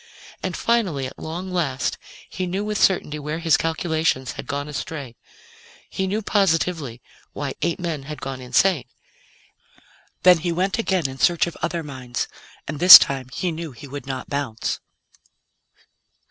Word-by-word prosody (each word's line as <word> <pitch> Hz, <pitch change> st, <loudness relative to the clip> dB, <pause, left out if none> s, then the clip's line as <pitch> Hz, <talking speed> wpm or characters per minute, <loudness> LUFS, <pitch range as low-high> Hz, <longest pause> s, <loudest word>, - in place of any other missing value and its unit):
And -, -, -3 dB
finally, 195 Hz, -, 0 dB
at 130 Hz, -, -9 dB
long 175 Hz, +4 st, -6 dB
last, 150 Hz, -7 st, -1 dB, 0.3 s
he 185 Hz, -1 st, -4 dB
knew 195 Hz, +4 st, -2 dB
with 210 Hz, -1 st, -2 dB
certainty 150 Hz, -5 st, +2 dB
where 150 Hz, +2 st, -4 dB
his 165 Hz, -2 st, +3 dB
calculations 160 Hz, -5 st, 0 dB
had -, -, -8 dB
gone 145 Hz, 0 st, -3 dB
astray. 145 Hz, -4 st, -6 dB, 0.8 s
He 190 Hz, -, -2 dB
knew 210 Hz, +3 st, -2 dB
positively 165 Hz, -, 0 dB, 0.3 s
why 140 Hz, -2 st, -4 dB
eight 170 Hz, +1 st, -1 dB
men 165 Hz, -5 st, -3 dB
had 150 Hz, -, -6 dB
gone 135 Hz, -1 st, -6 dB
insane. 145 Hz, +4 st, +2 dB, 1.4 s
Then 180 Hz, -2 st, +7 dB
he 170 Hz, +2 st, -2 dB
went 185 Hz, +5 st, -1 dB
again 190 Hz, -8 st, 0 dB
in 130 Hz, 0 st, -9 dB
search 175 Hz, -2 st, +3 dB
of 170 Hz, -, -7 dB
other 170 Hz, 0 st, -2 dB
minds, 130 Hz, -4 st, -5 dB, 0.4 s
and 150 Hz, 0 st, -5 dB
this 180 Hz, +2 st, +13 dB
time 135 Hz, -2 st, -2 dB
he 180 Hz, +5 st, -2 dB
knew 160 Hz, -3 st, -6 dB
he 140 Hz, +4 st, -11 dB
would 140 Hz, -1 st, -8 dB
not 130 Hz, -2 st, -5 dB
bounce. 140 Hz, -6 st, -3 dB
160 Hz, 155 wpm, -22 LUFS, 140-180 Hz, 1.4 s, this